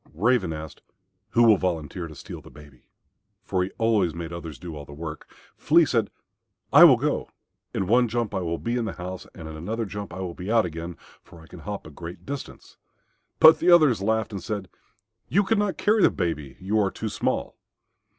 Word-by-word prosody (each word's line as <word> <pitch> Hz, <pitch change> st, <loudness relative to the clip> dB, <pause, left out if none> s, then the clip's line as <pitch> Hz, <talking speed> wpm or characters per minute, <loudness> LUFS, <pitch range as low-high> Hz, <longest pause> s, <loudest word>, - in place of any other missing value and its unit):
Raven 105 Hz, -1 st, +2 dB
asked, 80 Hz, -1 st, -8 dB, 0.5 s
"Who 120 Hz, -, +5 dB
will 110 Hz, -3 st, +6 dB
volunteer 85 Hz, -1 st, -3 dB
to 75 Hz, -, -12 dB
steal -, -, -9 dB
the -, -, -14 dB
baby?" 75 Hz, -4 st, -17 dB, 0.6 s
for 95 Hz, -2 st, 0 dB
he 90 Hz, -, -3 dB
always 110 Hz, -7 st, +2 dB
made 85 Hz, -1 st, -6 dB
the 85 Hz, -, -5 dB
others 80 Hz, -4 st, -8 dB
do 85 Hz, -3 st, -8 dB
all 75 Hz, -, -7 dB
the 70 Hz, -, -12 dB
work. 80 Hz, 0 st, -8 dB, 0.3 s
Flea 165 Hz, +2 st, +5 dB
said, 115 Hz, -7 st, 0 dB, 0.6 s
"I -, -, +10 dB
will -, -, +7 dB
go. -, -, -1 dB, 0.4 s
In 95 Hz, -, -1 dB
one 120 Hz, +5 st, +4 dB
jump 115 Hz, -1 st, -2 dB
I 95 Hz, -, 0 dB
will 85 Hz, -2 st, -2 dB
be 120 Hz, +6 st, -2 dB
into 115 Hz, -2 st, -2 dB
the -, -, -17 dB
house, 90 Hz, +1 st, -7 dB
and 80 Hz, -3 st, -8 dB
in 80 Hz, -, -8 dB
another 110 Hz, +9 st, -3 dB
jump 100 Hz, -1 st, -6 dB
I 90 Hz, +2 st, -6 dB
will 90 Hz, -2 st, -4 dB
be 90 Hz, +5 st, -5 dB
out 115 Hz, -3 st, +4 dB
again, 85 Hz, +1 st, -6 dB, 0.2 s
for 85 Hz, -, -16 dB
I -, -, -14 dB
can 90 Hz, -, -12 dB
hop 100 Hz, +4 st, -6 dB
a 80 Hz, -, -10 dB
great 85 Hz, +3 st, -9 dB
distance." 140 Hz, -1 st, -8 dB, 0.6 s
But 160 Hz, 0 st, +8 dB
the 175 Hz, -, +2 dB
others 155 Hz, -, +6 dB
laughed 110 Hz, +2 st, 0 dB
and 100 Hz, -2 st, -5 dB
said, 100 Hz, -3 st, -4 dB, 0.6 s
"You 200 Hz, -, +3 dB
could 205 Hz, +2 st, +1 dB
not 205 Hz, -2 st, 0 dB
carry 215 Hz, +1 st, +3 dB
the -, -, +6 dB
baby; 75 Hz, -6 st, -3 dB
you 100 Hz, +4 st, 0 dB
are 100 Hz, -2 st, +2 dB
too 110 Hz, -, -5 dB
small." 105 Hz, -, -2 dB
95 Hz, 215 wpm, -25 LUFS, 85-115 Hz, 0.6 s, I